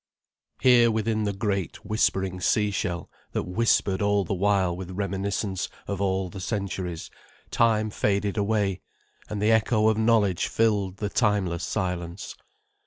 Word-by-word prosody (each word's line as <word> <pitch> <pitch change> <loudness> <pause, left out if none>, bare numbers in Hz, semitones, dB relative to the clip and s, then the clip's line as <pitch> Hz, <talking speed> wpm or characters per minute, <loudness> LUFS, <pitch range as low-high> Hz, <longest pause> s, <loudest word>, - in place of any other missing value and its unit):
Here, 120 -2 +6
within 110 -1 0
the 100 - 0
great, 100 -2 -3
whispering 95 -3 0
sea 105 +1 +2
shell, 90 -3 -3 0.2
that - - -1
whispered 95 -1 +1
all 100 -1 +2
the 95 - -3
while 95 -2 +1
with 90 0 -7
reminiscence 100 0 -2 0.2
of 100 -1 -3
all 95 -1 0
the 95 +2 -9
centuries, 95 -4 -4 0.4
time 110 -2 +2
faded 100 -1 0
away, 100 -3 0 0.5
and 105 - -3
the 105 +2 +3
echo 110 -1 +3
of 110 0 +1
knowledge 110 -5 +2
filled 105 -4 +1
the 105 - -2
timeless 95 -5 0
silence. 90 0 -3
100 Hz, 140 wpm, -26 LUFS, 95-110 Hz, 0.5 s, Here